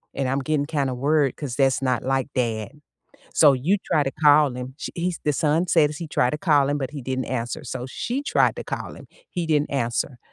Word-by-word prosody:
and 135 Hz, -2 st, -1 dB
I'm 135 Hz, +1 st, 0 dB
getting 145 Hz, +1 st, 0 dB
kinda 140 Hz, -4 st, -1 dB
worried 140 Hz, +1 st, +1 dB
'cause 135 Hz, -5 st, -5 dB
that's 135 Hz, -2 st, +2 dB
not 125 Hz, -3 st, 0 dB
like 135 Hz, 0 st, 0 dB
dad. 110 Hz, -4 st, -1 dB, 0.6 s
So 145 Hz, -3 st, +6 dB
you 160 Hz, +11 st, +1 dB
try 150 Hz, -, +2 dB
to 135 Hz, -, -2 dB
call 145 Hz, -4 st, +4 dB
him." 125 Hz, +1 st, -7 dB
She -, -, -6 dB
he's 175 Hz, 0 st, -2 dB
the 150 Hz, -, +2 dB
son 160 Hz, +5 st, +1 dB
said 150 Hz, -4 st, +4 dB
he 170 Hz, -, -6 dB
tried 125 Hz, -4 st, +1 dB
to 150 Hz, -, -2 dB
call 145 Hz, -6 st, +3 dB
him, 145 Hz, -, 0 dB
but 135 Hz, +1 st, -3 dB
he 145 Hz, -, -6 dB
didn't 130 Hz, +1 st, -3 dB
answer. 125 Hz, +4 st, -3 dB
So 130 Hz, -2 st, -5 dB
she 250 Hz, -, -3 dB
tried -, -, +2 dB
to -, -, -5 dB
call -, -, -5 dB
him. -, -, -13 dB, 0.2 s
He 175 Hz, -2 st, -3 dB
didn't 150 Hz, -2 st, +1 dB
answer. 125 Hz, -1 st, -1 dB
140 Hz, 225 wpm, -23 LUFS, 130-155 Hz, 0.6 s, So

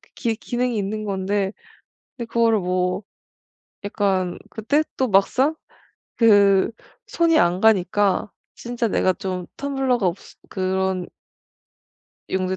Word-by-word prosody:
기 230 Hz, -1 st, -1 dB
기능이 245 Hz, +2 st, -2 dB
있는 210 Hz, +1 st, -3 dB
건데 195 Hz, 0 st, -1 dB, 0.6 s
근데 235 Hz, -, -4 dB
그거를 230 Hz, -2 st, +2 dB
뭐 180 Hz, +1 st, -1 dB, 0.8 s
약간 195 Hz, -3 st, -1 dB
그때 285 Hz, +8 st, 0 dB
또 260 Hz, -, +1 dB
막상 255 Hz, +9 st, +2 dB, 0.6 s
그 200 Hz, -4 st, +5 dB, 0.4 s
손이 335 Hz, -1 st, +2 dB
안 175 Hz, +2 st, +2 dB
가니까 205 Hz, -1 st, +2 dB, 0.2 s
진짜 240 Hz, -1 st, -3 dB
내가 185 Hz, -3 st, +1 dB
좀 185 Hz, -1 st, -5 dB
텀블러가 270 Hz, -4 st, -1 dB
없어 180 Hz, +2 st, -4 dB
그런 190 Hz, -1 st, -1 dB, 1.2 s
'용도의 190 Hz, 0 st, -1 dB
205 Hz, 210 characters per minute, -22 LUFS, 190-235 Hz, 1.2 s, 그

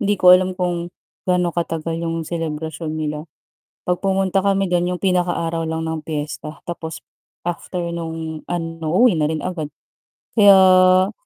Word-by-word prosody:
hindi 205 Hz, -2 st, +1 dB
ko 180 Hz, 0 st, +8 dB
alam 185 Hz, 0 st, +4 dB
kung 175 Hz, -1 st, -2 dB, 0.4 s
gaano 180 Hz, -1 st, +2 dB
katagal 165 Hz, -1 st, -2 dB
yung 165 Hz, 0 st, -2 dB
selebrasyon 160 Hz, -1 st, -4 dB
nila. 150 Hz, -1 st, -2 dB, 0.7 s
'Pag 180 Hz, 0 st, 0 dB
pumunta 195 Hz, 0 st, +1 dB
kami 195 Hz, 0 st, +2 dB
dun 175 Hz, -1 st, +1 dB
yung 180 Hz, 0 st, -4 dB
pinakaaraw 175 Hz, -3 st, 0 dB
lang 160 Hz, 0 st, -3 dB
ng 160 Hz, -1 st, -3 dB
piyesta 150 Hz, 0 st, -5 dB
tapos 165 Hz, -2 st, -6 dB, 0.4 s
after 175 Hz, +1 st, -3 dB
nung 160 Hz, -2 st, -5 dB
ano 165 Hz, -2 st, -4 dB
uuwi 245 Hz, -1 st, +6 dB
na 155 Hz, -, +2 dB
rin 160 Hz, -1 st, -2 dB
agad 170 Hz, -5 st, -3 dB, 0.7 s
kaya 185 Hz, -2 st, +6 dB
175 Hz, 145 wpm, -20 LUFS, 160-185 Hz, 0.7 s, ko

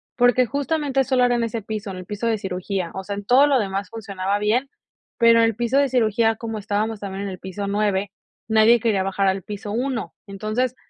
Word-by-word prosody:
porque 245 Hz, 0 st, +4 dB
justamente 285 Hz, 0 st, 0 dB
solo 260 Hz, -1 st, +2 dB
era 245 Hz, 0 st, +2 dB
en 235 Hz, -, 0 dB
ese 230 Hz, -1 st, -3 dB
piso, 215 Hz, -1 st, -5 dB
en 185 Hz, -, -7 dB
el 185 Hz, -, -8 dB
piso 210 Hz, +3 st, -3 dB
de 225 Hz, -1 st, +1 dB
cirugía, 185 Hz, -2 st, -3 dB
o 190 Hz, -, -5 dB
sea, 200 Hz, +1 st, -4 dB
en 200 Hz, 0 st, -7 dB
todo 265 Hz, +6 st, +5 dB
lo 275 Hz, -3 st, +3 dB
demás 195 Hz, -2 st, -3 dB
funcionaba 200 Hz, -2 st, -3 dB
bien, 235 Hz, +6 st, +1 dB, 0.5 s
pero 230 Hz, -1 st, +6 dB
en 230 Hz, -, +5 dB
el 225 Hz, -2 st, 0 dB
piso 240 Hz, +3 st, 0 dB
de 280 Hz, -1 st, +3 dB
cirugía, 225 Hz, -2 st, +2 dB
como 225 Hz, -1 st, -5 dB
estábamos 210 Hz, +1 st, -2 dB
también 195 Hz, 0 st, -5 dB
en 200 Hz, -, -3 dB
el 185 Hz, -, -7 dB
piso 195 Hz, +2 st, -5 dB
9, 200 Hz, -1 st, 0 dB, 0.4 s
nadie 220 Hz, +2 st, +5 dB
quería 210 Hz, -4 st, +1 dB
bajar 195 Hz, +1 st, 0 dB
al 190 Hz, 0 st, +1 dB
piso 205 Hz, 0 st, -6 dB
1. 250 Hz, +1 st, -2 dB
Entonces, 215 Hz, +6 st, -2 dB
215 Hz, 220 wpm, -22 LUFS, 200-240 Hz, 0.5 s, pero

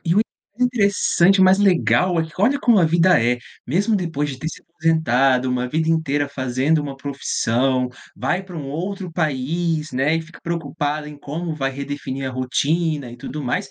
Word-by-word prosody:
E 170 Hz, +1 st, +2 dB
o 210 Hz, -, +5 dB, 0.4 s
interessante, 200 Hz, -5 st, +3 dB
mas 185 Hz, +1 st, +6 dB
legal, 185 Hz, -2 st, +3 dB, 0.2 s
olha 255 Hz, +8 st, +3 dB
como 235 Hz, -6 st, +4 dB
a 175 Hz, -, +5 dB
vida 170 Hz, +3 st, +4 dB
é, 120 Hz, +1 st, +2 dB, 0.3 s
mesmo 200 Hz, -, +1 dB
depois 160 Hz, -5 st, -2 dB
de 130 Hz, -2 st, -6 dB
ter 155 Hz, -, -6 dB
se -, -, -10 dB
aposentado, 135 Hz, -6 st, +2 dB
uma 125 Hz, 0 st, 0 dB
vida 160 Hz, +4 st, 0 dB
inteira 145 Hz, -3 st, +1 dB
fazendo 135 Hz, +3 st, 0 dB
uma 140 Hz, -2 st, -5 dB
profissão, 130 Hz, -2 st, 0 dB, 0.3 s
vai 180 Hz, +2 st, -1 dB
para 190 Hz, -2 st, -12 dB
um 140 Hz, -, -6 dB
outro 180 Hz, +5 st, -4 dB
país, 155 Hz, +1 st, -1 dB
né, 135 Hz, +5 st, +1 dB
e -, -, -1 dB
fica 165 Hz, +1 st, -13 dB
preocupada 150 Hz, -2 st, -3 dB
em 150 Hz, -, -10 dB
como 160 Hz, +4 st, -4 dB
vai 135 Hz, -3 st, -1 dB
redefinir 135 Hz, -1 st, -5 dB
a -, -, -6 dB
rotina 140 Hz, +2 st, 0 dB
e 120 Hz, -, -10 dB
tudo 145 Hz, +5 st, -6 dB
mais. 130 Hz, +1 st, -2 dB
155 Hz, 175 wpm, -21 LUFS, 135-175 Hz, 0.4 s, mas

